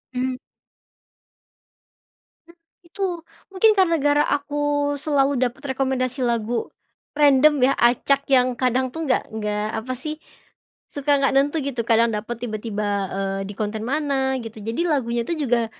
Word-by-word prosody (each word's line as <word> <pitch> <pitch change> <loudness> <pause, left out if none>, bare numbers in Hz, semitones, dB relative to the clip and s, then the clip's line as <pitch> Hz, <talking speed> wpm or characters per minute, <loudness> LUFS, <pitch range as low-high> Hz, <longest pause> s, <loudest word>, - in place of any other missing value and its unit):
Mmm. 255 0 -1 2.1
M 340 - -18 0.3
itu 390 +3 -3 0.5
mungkin 430 +3 +4 0.3
gara 290 0 +3
aku 290 0 0
selalu 280 -1 +1
dapat 260 +1 -2
rekomendasi 260 -1 -1
lagu 235 0 -1 0.5
random 290 0 +5
ya, 275 - +3
acak 270 +4 +2
yang 255 -2 +4
kadang 255 +1 0
tuh, 325 0 -4
nggak 255 - +2
nggak 210 -1 -2
apa 255 +3 -4
sih, 310 +3 -6 0.7
suka 285 0 +1
nggak 275 -1 +2
nentu 285 +4 +2
gitu. 260 -4 -2
Kadang 230 0 +3
dapat 220 +2 -4
tiba-tiba, 210 -3 -2
eee, 195 0 -3
di 205 - -6
konten 215 0 -3
mana 270 -1 0
gitu, 225 -1 -9
jadi 225 +8 -3
lagunya 240 -6 0
itu - - -1
juga 235 -1 +2
260 Hz, 135 wpm, -22 LUFS, 230-285 Hz, 2.1 s, random